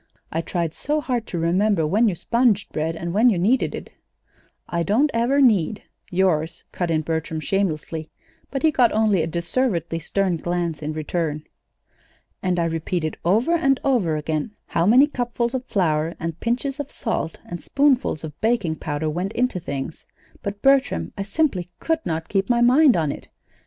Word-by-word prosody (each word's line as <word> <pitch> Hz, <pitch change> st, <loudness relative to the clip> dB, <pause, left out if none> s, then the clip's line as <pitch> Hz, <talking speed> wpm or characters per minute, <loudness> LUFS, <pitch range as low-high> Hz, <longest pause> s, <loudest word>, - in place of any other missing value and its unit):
I 165 Hz, -, -1 dB
tried 170 Hz, -2 st, -2 dB
so 300 Hz, -, -1 dB
hard 245 Hz, -6 st, -2 dB
to 175 Hz, -, -4 dB
remember 175 Hz, +1 st, +2 dB
when 215 Hz, +8 st, +3 dB
you 185 Hz, -, -2 dB
sponged 230 Hz, +2 st, +1 dB
bread 160 Hz, +1 st, -1 dB
and 170 Hz, +1 st, -4 dB
when 225 Hz, +5 st, +5 dB
you 205 Hz, -, +1 dB
kneaded 220 Hz, +9 st, +2 dB
it." -, -, -8 dB, 0.8 s
"I 170 Hz, -, -1 dB
don't 235 Hz, -, +2 dB
ever 240 Hz, +5 st, +2 dB
need 210 Hz, -, +3 dB, 0.3 s
yours," 175 Hz, -3 st, 0 dB
cut 175 Hz, -2 st, -2 dB
in 160 Hz, -1 st, +2 dB
Bertram, 160 Hz, 0 st, -3 dB
shamelessly; 160 Hz, -4 st, -2 dB, 0.4 s
but 270 Hz, +1 st, -4 dB
he 315 Hz, -, +5 dB
got 250 Hz, -5 st, +4 dB
only 215 Hz, -4 st, +3 dB
a 160 Hz, -, -1 dB
deservedly 170 Hz, -, -1 dB
stern 185 Hz, +2 st, 0 dB
glance 170 Hz, -2 st, -2 dB
in 155 Hz, +1 st, -3 dB
return. 155 Hz, -1 st, -2 dB, 1.0 s
"And 180 Hz, -1 st, 0 dB
I 170 Hz, -, +2 dB
repeated 165 Hz, 0 st, -2 dB
over 215 Hz, -, +2 dB
and 275 Hz, -6 st, +2 dB
over 220 Hz, -, +2 dB
again 155 Hz, +7 st, -3 dB
how 170 Hz, +1 st, 0 dB
many 250 Hz, +6 st, +7 dB
cupfuls 240 Hz, -3 st, -2 dB
of 260 Hz, -1 st, -3 dB
flour 165 Hz, -6 st, 0 dB
and 165 Hz, 0 st, -4 dB
pinches 260 Hz, +5 st, -2 dB
of 290 Hz, -1 st, -4 dB
salt 195 Hz, -8 st, -3 dB
and 175 Hz, -, -7 dB
spoonfuls 275 Hz, -, +2 dB
of 155 Hz, -2 st, -8 dB
baking 215 Hz, -8 st, +1 dB
powder 145 Hz, +1 st, -3 dB
went 180 Hz, +7 st, -2 dB
into 250 Hz, -6 st, 0 dB
things; 140 Hz, -2 st, -6 dB, 0.3 s
but, 200 Hz, 0 st, -5 dB
Bertram, 265 Hz, -, +2 dB
I -, -, -4 dB
simply 200 Hz, -, 0 dB
could 325 Hz, -1 st, 0 dB
not 165 Hz, 0 st, -2 dB
keep 195 Hz, +1 st, 0 dB
my 240 Hz, -1 st, +3 dB
mind 255 Hz, -, +6 dB
on 155 Hz, -4 st, +1 dB
it. -, -, -9 dB
185 Hz, 175 wpm, -23 LUFS, 165-240 Hz, 1.0 s, many